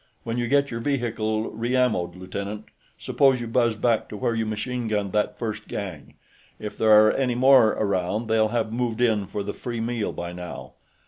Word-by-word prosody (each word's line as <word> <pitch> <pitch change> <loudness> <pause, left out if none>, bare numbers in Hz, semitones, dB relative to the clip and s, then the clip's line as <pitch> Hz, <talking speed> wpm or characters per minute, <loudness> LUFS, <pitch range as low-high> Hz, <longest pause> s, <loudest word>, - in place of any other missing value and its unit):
When 115 +1 -3
you 120 - -1
get 140 +2 +2
your 115 - -3
vehicle 115 -4 -1
re 120 +3 -2
ammoed, 105 -9 +1
lieutenant, 100 +3 -6 0.3
suppose 135 -2 +2
you 120 - -4
buzz 115 -1 +1
back 115 0 0
to 105 - -7
where 115 - 0
you 110 -1 -1
machine 120 +3 -3
gunned 105 -3 -1
that 105 0 0
first 110 -2 -4
gang. 95 -8 -6 0.4
If 105 -1 -7
there 110 - +1 0.2
are 110 - +5
any 125 -3 0
more 130 -3 +6
around, 100 +2 -1
they'll 110 0 +2
have 110 -1 -2
moved 120 -1 -2
in 110 -5 +2
for 100 +1 -4
the 105 - -4
free 120 -2 -5
meal 115 -1 -2
by 85 0 -6
now." 90 0 -8
110 Hz, 195 wpm, -24 LUFS, 105-120 Hz, 0.4 s, more